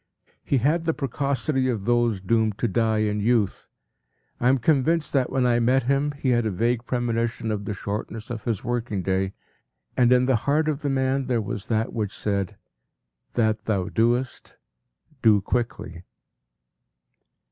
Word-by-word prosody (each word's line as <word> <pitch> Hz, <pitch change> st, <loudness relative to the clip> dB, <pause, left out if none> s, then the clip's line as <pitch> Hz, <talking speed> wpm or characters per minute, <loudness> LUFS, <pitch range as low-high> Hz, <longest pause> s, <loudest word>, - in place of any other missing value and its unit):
” -, -, -38 dB
He 140 Hz, -, +5 dB
had 155 Hz, +7 st, +1 dB
the 160 Hz, -, +1 dB
precocity 140 Hz, 0 st, -1 dB
of 110 Hz, -5 st, -2 dB
those 120 Hz, -4 st, +2 dB
doomed 110 Hz, +1 st, +1 dB
to 120 Hz, -, 0 dB
die 110 Hz, 0 st, +1 dB
in 105 Hz, 0 st, -1 dB
youth. 110 Hz, -2 st, 0 dB, 0.7 s
I 125 Hz, -, +3 dB
am 135 Hz, -, +4 dB
convinced 155 Hz, +4 st, +1 dB
that 130 Hz, -3 st, +2 dB
when 130 Hz, -1 st, +1 dB
I 120 Hz, -1 st, +3 dB
met 125 Hz, +2 st, +3 dB
him 140 Hz, +3 st, +1 dB
he 140 Hz, -2 st, -2 dB
had 120 Hz, -1 st, +2 dB
a 110 Hz, -, 0 dB
vague 115 Hz, +5 st, -1 dB
premonition 115 Hz, -2 st, -1 dB
of 105 Hz, -1 st, -3 dB
the 105 Hz, -, -3 dB
shortness 105 Hz, +3 st, -5 dB
of 115 Hz, -2 st, -6 dB
his 115 Hz, -5 st, -2 dB
working 120 Hz, -5 st, -2 dB
day, 95 Hz, +1 st, 0 dB, 0.6 s
and 125 Hz, -1 st, +4 dB
in 125 Hz, 0 st, +5 dB
the 130 Hz, -2 st, +3 dB
heart 155 Hz, +2 st, +2 dB
of 155 Hz, -1 st, -1 dB
the 145 Hz, -, -1 dB
man 135 Hz, 0 st, 0 dB
there 125 Hz, -2 st, +1 dB
was 105 Hz, -2 st, -5 dB
that 110 Hz, 0 st, 0 dB
which 105 Hz, -3 st, -3 dB
said, 100 Hz, -3 st, -2 dB, 0.8 s
“That 110 Hz, -2 st, +1 dB
thou 100 Hz, -3 st, -1 dB
doest, 120 Hz, +3 st, -1 dB, 0.6 s
do 110 Hz, -3 st, +5 dB
quickly. 100 Hz, -5 st, -3 dB
120 Hz, 170 wpm, -24 LUFS, 110-130 Hz, 0.8 s, He